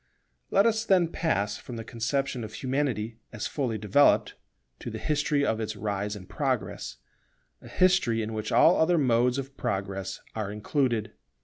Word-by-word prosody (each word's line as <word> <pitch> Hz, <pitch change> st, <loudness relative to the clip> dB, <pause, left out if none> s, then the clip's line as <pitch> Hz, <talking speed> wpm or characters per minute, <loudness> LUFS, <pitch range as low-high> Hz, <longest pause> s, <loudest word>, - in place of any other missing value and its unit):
Let 200 Hz, -, +4 dB
us 225 Hz, -1 st, +2 dB
then 185 Hz, -6 st, +3 dB
pass 105 Hz, -, -1 dB
from 125 Hz, -, -9 dB
the 115 Hz, -, -5 dB
conception 120 Hz, +3 st, -2 dB
of 110 Hz, 0 st, -7 dB
Humanity 125 Hz, -5 st, -2 dB
as 105 Hz, -, -5 dB
fully 125 Hz, -7 st, -2 dB
developed, 105 Hz, +7 st, +3 dB, 0.5 s
to -, -, -6 dB
the -, -, -5 dB
history 150 Hz, -1 st, +1 dB
of 110 Hz, -, 0 dB
its 110 Hz, -1 st, -3 dB
rise 105 Hz, 0 st, -2 dB
and 95 Hz, -3 st, -10 dB
progress; 130 Hz, -7 st, -2 dB, 0.7 s
a -, -, -12 dB
history 180 Hz, -12 st, +2 dB
in 110 Hz, +1 st, -4 dB
which 110 Hz, 0 st, -4 dB
all 170 Hz, -, +6 dB
other 170 Hz, +2 st, +3 dB
modes 125 Hz, -2 st, +3 dB
of 135 Hz, 0 st, -5 dB
progress 95 Hz, -1 st, -3 dB
are 105 Hz, -2 st, -3 dB
included. 115 Hz, +1 st, -1 dB
115 Hz, 165 wpm, -27 LUFS, 105-145 Hz, 0.7 s, all